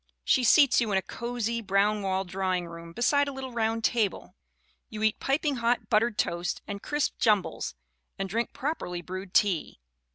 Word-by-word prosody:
She 255 - +3
seats 260 +1 +6
you 225 -3 0
in 195 - +3
a 190 - 0
"cozy, 235 -1 -3
brown 205 +1 +2
walled 190 -1 -1
drawing 185 -1 -1
room, 170 0 -9
beside 285 - +2
a - - -2
little 265 -1 -6
round 225 -1 -1
table/* 225 -4 0 0.6
You 215 0 -5
eat 220 -1 +2
"piping 280 0 0
hot 235 +1 0
buttered 220 0 +3
toast 170 +1 -1
and 200 -1 -5
crisp 295 -1 -1
jumbles, 210 - +1 0.4
and 195 - -2
drink 230 +5 -2
prop 300 +4 -3
erly 175 -1 -5
brewed 185 0 -7
tea. 190 - +2
215 Hz, 175 wpm, -28 LUFS, 190-240 Hz, 0.6 s, seats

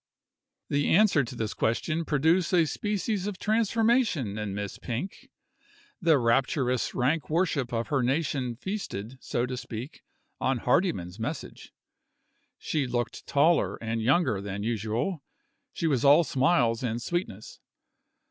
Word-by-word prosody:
The 145 0 0
answer 190 -6 +5
to 125 +1 -7
this 110 -2 -3
question 155 +9 -1
produced 160 +5 +2
a 170 -2 +5
species 205 +3 -2
of 205 -3 -4
transformation 220 - +1
in 100 -2 -3
Miss 100 -1 -5
Pink. 125 +11 -5 0.7
The 165 -4 +5
rapturous 125 0 +1
rank 130 +2 0
worship 155 -6 0
of 115 -1 -2
her 140 -4 +1
nation 130 -2 0
feasted, 130 - -5
so 120 - -1
to 125 0 -4
speak, 120 +3 -7 0.4
on 130 0 +1
Hardyman's 120 - 0
message. 140 +7 -6 0.9
She 145 -4 -1
looked 120 -1 -3
taller 160 +4 +3
and 115 0 -3
younger 125 - +2
than 100 0 -5
usual 115 - -2 0.5
she - - -4
was 140 -7 +1
all 145 +4 +7
smiles 130 -5 +2
and 120 -2 -2
sweetness. 120 - -4
135 Hz, 130 wpm, -27 LUFS, 115-170 Hz, 0.9 s, all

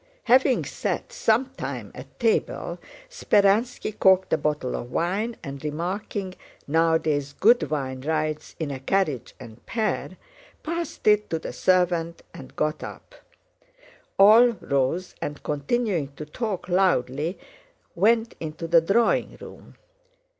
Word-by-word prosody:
Having 255 +2 +4
sat - - -4
some 235 +4 +2
time 265 - -6
at - - -12
table, 450 0 0 0.3
Speránski 215 - +1
corked 190 -1 +4
a - - +4
bottle 150 -4 -1
of 120 - -6
wine 205 +7 -1
and, 140 0 -7
remarking, 185 +5 -4 0.3
"Nowadays 155 -2 +1
good 235 +4 +4
wine 130 -4 -3
rides 155 +1 -2
in 155 -3 -3
a 135 - -5
carriage 145 - -1
and 115 -3 -12
pair," 220 -2 -2 0.5
passed 335 +1 -4
it 210 0 +4
to 165 - -1
the 160 - -7
servant 175 -2 +1
and 130 - -12
got 155 0 -1
up. - - -9 1.0
All 215 +5 +8
rose 140 +7 -1
and 145 0 -5
continuing 165 - -1
to 150 - -7
talk 195 +4 -4
loudly 175 -3 +1 0.6
went 225 +5 +2
into 160 +1 -6
the 165 0 +5
drawing 210 +8 +1
room. - - -13
175 Hz, 125 wpm, -25 LUFS, 150-215 Hz, 1.0 s, All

